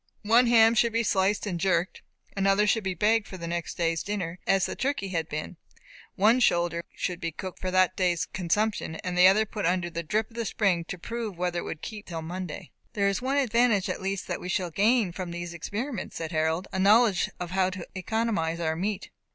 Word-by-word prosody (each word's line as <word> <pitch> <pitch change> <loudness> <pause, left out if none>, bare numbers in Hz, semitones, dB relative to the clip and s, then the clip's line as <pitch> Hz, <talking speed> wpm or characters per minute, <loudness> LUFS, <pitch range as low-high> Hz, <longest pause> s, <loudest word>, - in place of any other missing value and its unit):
One 235 +4 +5
ham 225 -1 +6
should 235 0 +2
be 230 +1 +2
sliced 200 0 +1
and 180 -4 -3
jerked; 180 -1 0 0.3
another 195 +1 +3
should 220 +1 +2
be 190 -1 -2
baked 215 +4 +2
for 190 - -8
the 170 - -6
next 170 -1 -3
day's 165 -1 0
dinner, 185 -4 -4
as 195 -1 +3
the - - -4
turkey 270 -8 -2
had 165 -3 -2
been; 155 +3 -5 0.6
one 220 +4 +4
shoulder 170 -6 +2
should 180 -1 -3
be 165 - -2
cooked 185 +3 -7
for 185 - -2
that 185 0 +3
day's 180 -3 +1
consumption, 190 0 -1
and 180 -1 -3
the 180 +1 +7
other 210 +3 +4
put 210 -1 -3
under 175 -1 0
the 170 0 -3
drip 215 +8 -1
of - - -18
the 230 - -1
spring 195 -6 +1
to 180 - -6
prove 225 0 -5
whether 175 0 -1
it - - -6
would 160 - -6
keep 210 -2 -7
until 165 -2 -5
Monday. 175 0 -6 0.2
"There 200 -1 +2
is 200 +3 -2
one 270 +2 0
advantage 235 -6 +2
at - - -3
least 195 0 -2
that 175 - -4
we 180 - -6
shall 180 -1 -1
gain 210 +2 +2
from 180 0 -5
these 175 0 -5
experiments," 215 - -5
said 165 0 -4
Harold; 160 +3 0
"a 190 - -1
knowledge 205 -1 +4
how 185 +1 0
to 185 -2 -7
economize 190 -4 -1
our 160 -1 0
meat." 195 +4 -3
190 Hz, 215 wpm, -27 LUFS, 175-215 Hz, 0.6 s, the